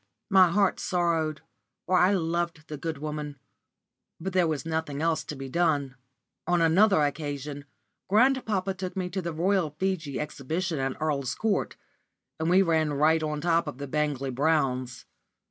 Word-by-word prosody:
My 190 -2 +7
heart 195 +2 +2
sorrowed, 165 -4 0 0.4
for 185 - +1
I 185 +3 +4
loved 170 -2 -2
the 155 - -4
good 160 0 -4
woman; 150 -1 -5 0.8
but 185 +3 -4
there 180 -2 +3
was 150 -3 -2
nothing 160 -3 -2
else 160 0 +1
to 150 - -6
be 135 0 -7
done. 145 -3 +1 0.5
On 175 0 +3
another 170 +1 +4
occasion 145 -1 -3 0.4
grandpapa 215 -3 +2
took 185 0 -6
me 180 -1 -2
to 190 +1 -2
the 170 -1 -3
Royal 175 +1 +1
Figi 160 -2 -2
Exhibition 155 +3 -3
at 135 0 -2
Earl's 145 -4 -1
Court, 215 -3 -1 0.6
and 160 +1 0
we 185 +2 +5
ran 160 -4 +1
right 155 +3 +3
on 150 -1 -2
top 170 0 +2
of 145 - -5
the 140 +1 -6
Bangley 140 -2 -1
Browns. 130 -3 0
160 Hz, 160 wpm, -27 LUFS, 145-180 Hz, 0.8 s, My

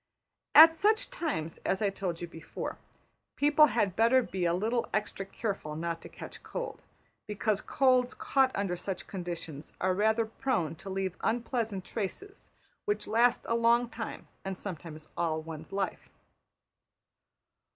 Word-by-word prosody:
At 325 +2 +11
such 430 +7 +2
times, 295 - -3
as 190 - 0
I 200 - +2
told 180 -4 -3
you 175 - -3
before, 165 -1 -6 0.6
people 295 +1 +6
had 210 -7 +1
better 235 +4 +5
be 185 -5 -2
a 170 - +3
little 225 +6 0
extra 205 -2 -2
careful 195 -8 -4
not 165 +1 -3
to - - -10
catch - - -9
cold; - - -5 0.5
because 210 0 0
colds 255 -2 +3
caught 270 -1 +3
under 195 -3 0
such 185 +1 -5
conditions 170 -5 -6
are 185 0 +2
rather 220 +3 +2
prone 220 - -1
to 195 - -8
leave 190 -1 -2
unpleasant 230 -5 -1
traces, 390 - -5 0.4
which 415 -1 0
last 235 +2 +3
a - - +1
long 235 +1 +3
time, - - -6 0.2
and 195 -1 -4
sometimes 160 -5 -7
all 160 -2 0
one's 160 0 -8
life. 195 -2 -3
205 Hz, 145 wpm, -30 LUFS, 175-245 Hz, 0.6 s, At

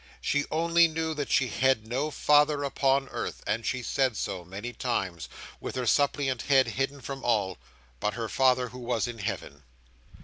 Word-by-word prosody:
She 145 0 0
only 170 +1 +4
knew 160 0 -2
that 145 -2 -4
she 125 -2 +2
had 130 -4 +2
no 130 +7 -1
Father 150 -1 +3
upon 135 0 +1
earth, - - -5
and 115 +2 -1
she 130 +2 -2
said 130 -3 +1
so, 95 -3 -3
many 100 +7 -7
times, 95 - -2 0.3
with - - -6
her 130 -1 -2
suppliant 135 0 +2
head 135 -2 +4
hidden 135 +1 -2
from 135 -1 -6
all, 100 -6 +1 0.4
but 105 +6 -1
her 115 -1 -3
Father 125 0 +2
who 125 +2 -10
was 120 -2 -1
in 120 -2 -7
Heaven. 70 -7 -5
130 Hz, 175 wpm, -28 LUFS, 115-140 Hz, 0.4 s, only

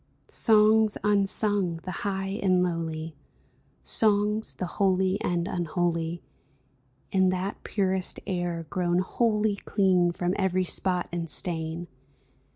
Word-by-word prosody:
Songs 215 -1 +4
unsung, 200 -3 +1
the 185 - -5
high 195 +2 -3
and 185 -2 +3
lowly, 165 -2 -3 0.7
Songs, 210 0 +1
the 185 - -3
holy 190 +1 +1
and 175 0 -1
unholy, 170 -1 -2 0.9
In 190 -1 +3
that 185 +2 -3
purest 190 -2 0
air 175 -3 -2
grown 175 +1 0
wholly 210 +2 +1
Clean 185 -4 +2
from 175 +1 -1
every 185 -1 +1
spot 180 0 +1
and 170 -1 -4
stain 165 0 -2
185 Hz, 110 wpm, -27 LUFS, 175-200 Hz, 0.9 s, Songs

